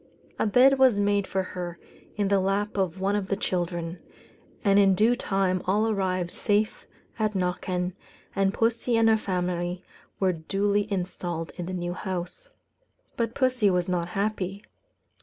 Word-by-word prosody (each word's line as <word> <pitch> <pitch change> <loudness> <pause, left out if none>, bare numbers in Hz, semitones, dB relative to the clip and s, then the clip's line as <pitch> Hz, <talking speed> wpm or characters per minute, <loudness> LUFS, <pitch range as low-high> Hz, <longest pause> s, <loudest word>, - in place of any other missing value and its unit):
A - - +2
bed 260 +5 +5
was 255 -6 +5
made 205 -1 +2
for 190 0 -1
her 175 -2 -6 0.4
in 205 -2 0
the 200 -1 +4
lap 200 +2 0
of 190 -2 -1
one 195 +2 +1
of 200 -2 -1
the 200 - 0
children; 175 -2 -2 0.6
and 200 -2 +5
in 195 -1 +5
due 225 +5 +4
time 195 -5 0
all 210 +4 +2
arrived 185 -4 -1
safe 210 +1 0 0.3
at 215 -1 0
Knockan, 180 0 -1 0.4
and 195 -1 +2
pussy 230 +2 +1
and 225 0 +4
her 220 - +6
family 180 -2 -2 0.4
were 190 -2 +2
duly 200 +5 0
installed 175 -3 -3
in 175 -1 -5
the 185 - -4
new 175 -1 -3
house. 190 - -5 0.7
But 230 +1 -2
pussy 255 -6 +2
was 180 -2 +1
not 175 -2 -1
happy. 195 +1 -2
195 Hz, 160 wpm, -26 LUFS, 180-210 Hz, 0.7 s, her